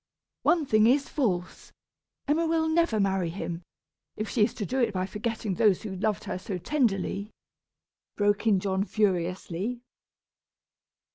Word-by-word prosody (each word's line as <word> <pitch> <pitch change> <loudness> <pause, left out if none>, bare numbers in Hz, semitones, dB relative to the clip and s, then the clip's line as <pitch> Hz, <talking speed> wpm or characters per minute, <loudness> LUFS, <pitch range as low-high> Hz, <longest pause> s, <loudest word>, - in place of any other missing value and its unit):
"One 335 -3 +3
thing 215 -3 +4
is 275 +3 +3
false! 185 - -2 0.6
Emma 320 +3 +2
will 320 0 +1
never 320 -8 +2
marry 190 -3 +1
him, 170 -1 -5 0.6
if 215 - -2
she 225 - +2
is - - +1
to 210 - -3
do 260 +7 -2
it 235 -5 +1
by 185 0 0
forgetting 215 0 -3
those 210 -1 +3
who 200 -3 -5
loved 205 +2 -1
her - - -4
so 190 0 -4
tenderly," 200 - 0 0.9
broke 205 +1 +2
in 200 -3 +4
John, 190 0 0
furiously. 190 +3 -1
210 Hz, 145 wpm, -27 LUFS, 190-240 Hz, 0.9 s, thing